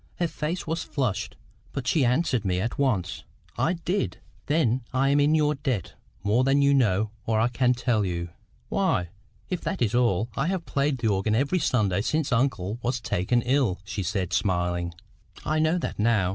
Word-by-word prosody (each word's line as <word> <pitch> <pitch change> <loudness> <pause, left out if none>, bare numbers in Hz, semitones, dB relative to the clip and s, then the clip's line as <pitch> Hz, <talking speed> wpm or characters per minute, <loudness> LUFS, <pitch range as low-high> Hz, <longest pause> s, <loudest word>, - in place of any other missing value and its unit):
Her 175 - 0
face 160 +2 -3
was 160 +1 -2
flushed. 125 -10 -2 0.4
But 135 - -4
she 130 +3 +2
answered 125 -1 +1
me 90 -2 0
at 115 +7 -3
once. 115 -11 0 0.3
"I 170 - +1
did." 180 +3 -2 0.3
"Then 130 -5 +2
I 135 +1 +2
am 145 +1 +4
in 145 +2 +4
your 150 -1 +3
debt 130 - -3 0.3
more 110 +5 +3
than 135 +2 +3
you 140 0 +5
know 110 -5 +2 0.2
or 110 -1 +2
I 115 +2 +3
can 125 +1 +2
tell 120 -3 +1
you." 85 -2 -3 0.4
"Why, 90 +5 0 0.4
if 180 - -1
that 190 - -3
is 115 -3 +1
all, 115 -4 +2
I 140 +4 0
have 185 -2 -2
played 140 0 0
the 120 -2 -1
organ 100 +2 +1
every 140 +9 +1
Sunday 105 - +1
since 155 +5 0
uncle 115 -4 0
was 120 +1 -1
taken 115 +3 0
ill," 125 -7 +1
she 105 -1 -4
said, 90 0 -2
smiling. 90 -2 0 0.5
"I 155 0 +1
know 160 +3 +2
that 170 - -4
now. 105 -4 +3
125 Hz, 185 wpm, -26 LUFS, 100-145 Hz, 0.5 s, you